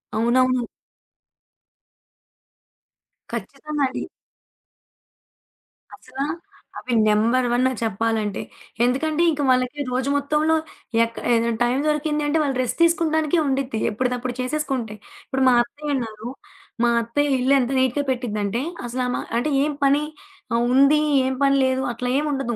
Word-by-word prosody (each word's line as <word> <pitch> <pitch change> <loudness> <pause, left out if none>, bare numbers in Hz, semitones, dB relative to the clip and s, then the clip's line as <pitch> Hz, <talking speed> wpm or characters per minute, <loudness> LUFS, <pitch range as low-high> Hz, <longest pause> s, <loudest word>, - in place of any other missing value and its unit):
అవునవును. 250 +2 +2 2.7
ఖచ్చితంగా 280 +7 -4
అండి. 260 - -5 1.9
అసలా! 265 +2 -6 0.6
అవి 250 - -4
నంబర్ 230 +4 +3
1 260 +1 +2
చెప్పాలంటే. 220 -1 -1 0.4
ఎందుకంటే 305 +6 0
ఇంక 295 - -3
వాళ్ళకి 255 +3 +1
రోజు 260 +2 -1
మొత్తంలో 300 +3 +1 0.5
ఎక్క 230 0 -4 0.2
ఏదైనా 230 0 +2
టైం 240 +2 +1
దొరికింది 300 0 0
అంటే 300 +2 +1
వాళ్ళు 270 -3 -1
రెస్ట్ 250 - -3
తీసుకోవటానికే 325 -1 +2
ఉండిద్ది, 265 -4 -1
ఎప్పటిదప్పుడు 250 +2 -2
చేసేసుకుంటే. 255 -5 -2 0.3
ఇప్పుడు 265 -2 0
మా - - +5
అత్తయ్య 290 +4 -4
ఉన్నారు, 225 -2 -5 0.6
మా - - +4
అత్తయ్య 275 +4 0
ఇల్లు 260 +2 +3
ఎంత 250 +1 -1
నీట్‌గా 260 +2 +1
పెట్టిద్దంటే, 225 -2 -2 0.3
అసలు 255 +2 -2
ఆమా 245 - -2 0.2
అంటే 300 +5 -1
ఏం 295 0 -1
పని 285 +2 +3 0.5
ఆ - - +2 0.2
ఉంది, 280 +3 +5 0.2
ఏం 265 - 0
పని 275 0 +4
లేదు 260 0 0
అట్లా 245 +1 -4
ఏముండదు. 270 -5 -2
260 Hz, 120 wpm, -22 LUFS, 240-290 Hz, 2.7 s, మా